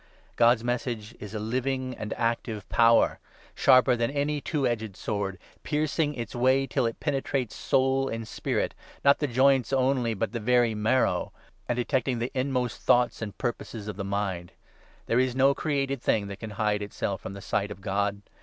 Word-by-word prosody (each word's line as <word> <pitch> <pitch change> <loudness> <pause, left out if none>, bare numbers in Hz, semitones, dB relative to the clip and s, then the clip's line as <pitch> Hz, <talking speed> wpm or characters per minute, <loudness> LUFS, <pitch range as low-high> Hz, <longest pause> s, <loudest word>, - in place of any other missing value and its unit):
God's 120 -1 +4
12 - - -7
Message 120 -2 -3
is 105 +1 -8
a - - -2
living 130 +3 -2
and 105 -1 -6
active 115 -3 -2
power, 115 0 +4 0.3
sharper 130 -1 +5
than 115 0 0
any 145 +1 -1
two 145 -3 -1
edged 110 -5 -2
sword, 100 -3 -3 0.2
piercing 150 0 0
its 115 -3 -5
way 130 +2 +3
till 130 -3 0
it 115 - -5
penetrates 135 -4 -1
soul 135 0 +1
and 115 -1 -4
spirit - - -2 0.2
— - - -23
not 140 0 +6
the 145 - 0
joints 130 0 +3
only 130 -3 +1
but 110 +3 -2
the 115 - -3
very 120 0 +3
marrow 110 +4 +1 0.2
— - - -36
and 120 - +1
detecting 125 0 0
the 120 +2 -2
inmost 130 -2 -1
thoughts 120 -1 +3
and 105 -3 -5
purposes 115 -3 -4
of 105 - -4
the 100 - -4
mind. 100 -3 -3 0.5
There 115 - +2
is 130 -1 +1
no 135 +1 +5
13 - - +3
created 140 -3 -1
thing 105 -4 +1
that 100 0 -7
can 110 - -6
hide 105 -1 +1
itself 100 -1 -3
from 95 - -7
the 100 - -8
sight 100 +1 -1
of 95 - -8
God. 100 +1 -1
120 Hz, 190 wpm, -27 LUFS, 105-130 Hz, 0.5 s, not